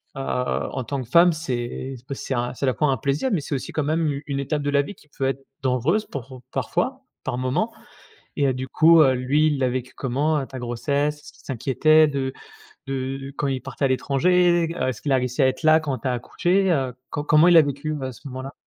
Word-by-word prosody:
heu, -, -, -6 dB
en 130 Hz, 0 st, -2 dB
tant 135 Hz, +2 st, -3 dB
que 115 Hz, -, -16 dB
femme 170 Hz, +3 st, +6 dB
c'est, 130 Hz, -3 st, -4 dB
ben 140 Hz, -, -4 dB
c'est 135 Hz, -, -4 dB
un, 120 Hz, +1 st, -2 dB
c'est 135 Hz, -, -3 dB
à -, -, 0 dB
la 130 Hz, -, +3 dB
fois 150 Hz, -2 st, +1 dB
un 130 Hz, -, +1 dB
plaisir 140 Hz, -, 0 dB
mais 170 Hz, -, +1 dB
c'est 145 Hz, -, -5 dB
aussi 130 Hz, -, -5 dB
quand 155 Hz, -, -1 dB
même 160 Hz, +2 st, 0 dB
u 140 Hz, +1 st, -5 dB
une 140 Hz, -1 st, -2 dB
étape 145 Hz, +2 st, -1 dB
de 145 Hz, -, -1 dB
la 140 Hz, 0 st, +3 dB
vie 200 Hz, +7 st, -8 dB
qui 150 Hz, -, -22 dB
peut 135 Hz, -, -3 dB
être 135 Hz, 0 st, -3 dB, 0.2 s
dangereuse 135 Hz, -, +1 dB
pour 130 Hz, -1 st, -8 dB
parfois, 260 Hz, +10 st, -2 dB, 0.2 s
par 125 Hz, -1 st, -2 dB
moments, 155 Hz, -, -1 dB, 0.6 s
et 140 Hz, -, +2 dB
heu, 130 Hz, -, +2 dB
du 130 Hz, +1 st, -5 dB
coup, 165 Hz, +3 st, +6 dB
heu, 135 Hz, -3 st, +5 dB
lui 135 Hz, +5 st, +2 dB
il 150 Hz, -2 st, +1 dB
l'a 130 Hz, -, +2 dB
vécu 130 Hz, 0 st, -4 dB
comment, 145 Hz, +4 st, 0 dB
heu, 135 Hz, -, -3 dB
ta 130 Hz, -, -8 dB
grossesse? 140 Hz, +5 st, -1 dB
Est-ce 150 Hz, -, -14 dB
qu'il -, -, -22 dB
s'inquiétait 150 Hz, +5 st, +3 dB
de 135 Hz, -2 st, -2 dB, 0.5 s
de 135 Hz, +1 st, -4 dB
quand 145 Hz, -, 0 dB
il 135 Hz, -2 st, -2 dB
partait 135 Hz, +1 st, -3 dB
à -, -, +4 dB
l'étranger? 170 Hz, +6 st, +2 dB
Heu, -, -, -1 dB
est-ce 125 Hz, -2 st, -5 dB
qu'il 145 Hz, -, -1 dB
a 135 Hz, -, +5 dB
réussi 125 Hz, +2 st, -1 dB
à -, -, +5 dB
être 130 Hz, +4 st, -2 dB
là 155 Hz, 0 st, +6 dB
quand 145 Hz, -4 st, -3 dB
tu 120 Hz, -, -4 dB
as 130 Hz, -, +1 dB
accouché? 180 Hz, +10 st, +1 dB
Heu, 135 Hz, -6 st, 0 dB, 0.2 s
co 145 Hz, -, -3 dB
comment 155 Hz, +3 st, +5 dB
il 175 Hz, -, +6 dB
l'a 165 Hz, -, +9 dB
vécu 145 Hz, +1 st, -3 dB
ouais 135 Hz, -3 st, -4 dB
ce 125 Hz, -, -12 dB
moment-là? 130 Hz, +1 st, -7 dB
140 Hz, 250 wpm, -23 LUFS, 130-155 Hz, 0.6 s, l'a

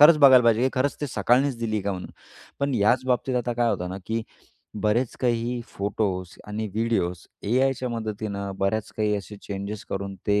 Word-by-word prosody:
खरंच 150 Hz, +1 st, +9 dB
बघायला 130 Hz, -3 st, +8 dB
पाहिजे, 115 Hz, +1 st, +4 dB
की 130 Hz, -, +4 dB
खरंच 135 Hz, +2 st, +1 dB
ते 145 Hz, -, -1 dB
सकाळनीच 130 Hz, 0 st, +2 dB
दिली 110 Hz, -2 st, -1 dB
का 100 Hz, 0 st, -1 dB
म्हणून. 90 Hz, -, -6 dB, 0.5 s
पण 140 Hz, -2 st, +1 dB
याच 120 Hz, +4 st, +3 dB
बाबतीत 125 Hz, 0 st, +1 dB
आता 120 Hz, 0 st, 0 dB
काय 120 Hz, -1 st, +2 dB
होतं 90 Hz, -, -2 dB
ना, 95 Hz, -, -4 dB
की 115 Hz, 0 st, -1 dB, 0.6 s
बरेच 115 Hz, +3 st, +1 dB
काही 120 Hz, 0 st, 0 dB
फोटोज 100 Hz, -3 st, -2 dB
आणि 110 Hz, +1 st, -3 dB
व्हिडिओज, 110 Hz, -6 st, 0 dB, 0.3 s
एआयच्या 130 Hz, 0 st, +2 dB
मदतीनं 105 Hz, -3 st, -3 dB
बऱ्याच 105 Hz, +2 st, 0 dB
काही 105 Hz, -1 st, +1 dB
असे 100 Hz, +1 st, -7 dB
चेंजेस 100 Hz, +1 st, -5 dB
करून 100 Hz, 0 st, -3 dB
ते 105 Hz, 0 st, +3 dB
110 Hz, 180 wpm, -25 LUFS, 100-125 Hz, 0.6 s, खरंच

